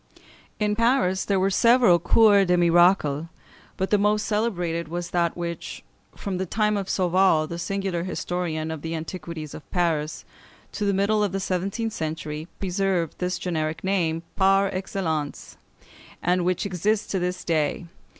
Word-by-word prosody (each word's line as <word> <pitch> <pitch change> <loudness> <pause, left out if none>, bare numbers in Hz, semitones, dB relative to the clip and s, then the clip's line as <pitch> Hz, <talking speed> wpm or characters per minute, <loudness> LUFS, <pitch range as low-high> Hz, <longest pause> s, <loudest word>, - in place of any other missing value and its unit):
] - - -28
In 210 0 +1
Paris 230 -5 +2
there 195 -2 +1
were 195 +1 +2
several 230 -4 +5
Cours 200 +2 +5
des 180 0 +3
Miracles, 170 -3 +3 0.5
but 190 - -2
the 210 - +4
most 210 +1 +2
celebrated 175 -7 -1
was 175 +2 -5
that 170 -1 0
which, 170 -1 -5 0.3
from 195 -3 -4
the 190 - -2
time 210 +2 +1
of 195 -2 -3
Sauval, 185 -3 +3
the 170 +1 -6
singular 195 -2 -2
historian 170 -3 -3
of 160 -2 -6
the 165 +1 -4
"Antiquities 160 -2 -6
of 155 - -11
Paris," 160 -4 -1 0.5
to 210 - -3
the 200 - +2
middle 210 +2 +2
of 200 -3 -1
the 195 - -1
seventeenth 195 +4 -2
century, 155 0 -4
preserved 185 -3 -1
this 180 0 -1
generic 160 -3 -3
name 170 -4 0
par 195 0 +3
excellence, 165 -6 -3 0.7
and 180 +1 +2
which 185 +3 0
exists 200 +3 0
to 190 - -2
this 180 +1 -3
day 155 -3 0
(Fig. 170 - -12
180 Hz, 160 wpm, -24 LUFS, 165-195 Hz, 0.7 s, several